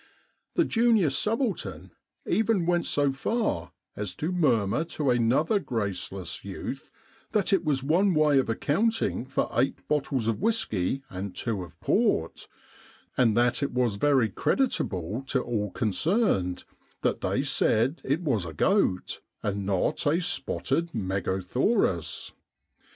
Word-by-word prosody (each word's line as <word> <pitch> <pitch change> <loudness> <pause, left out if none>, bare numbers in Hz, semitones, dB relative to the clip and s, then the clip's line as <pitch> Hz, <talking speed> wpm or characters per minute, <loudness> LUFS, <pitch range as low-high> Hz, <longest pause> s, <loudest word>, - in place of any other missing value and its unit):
The 340 - +3
junior 225 - +3
subaltern 150 - -1 0.3
even 210 -2 +1
went 175 0 +1
so 145 -1 +2
far 135 - -1 0.2
as 100 -3 -4
to 160 +4 -2
murmur 130 - +2
to 150 -5 -1
another 125 - +2
graceless 100 - -4
youth - - -6 0.4
that 210 -1 +2
it 185 -3 +3
was 140 -5 0
one 175 +6 +3
way 150 -2 +4
of 130 - -1
accounting 155 - 0
for 135 - 0
eight 130 +3 0
bottles 135 -5 0
of 115 +5 -1
whisky 135 - 0
and 95 -1 -5
two 105 0 -2
of 90 - -11
port 80 0 +1 0.4
— - - -28
and 115 -3 +3
that 120 +3 +3
it 140 - -1
was 120 -5 +1
very 130 -2 +3
creditable 105 - -1
to 130 - +1
all 105 -4 -2
con 110 -1 -1
cerned 100 - +1 0.4
that - - 0
they - - 0
said 125 +9 +1
it 145 +6 0
was 115 - 0
a 80 - -7
goat, 100 - +1 0.2
and 100 -1 -2
not 95 +7 0
a 155 +4 +3
spotted 170 -1 -1
megothaurus. 95 - -1
130 Hz, 140 wpm, -27 LUFS, -, 0.4 s, way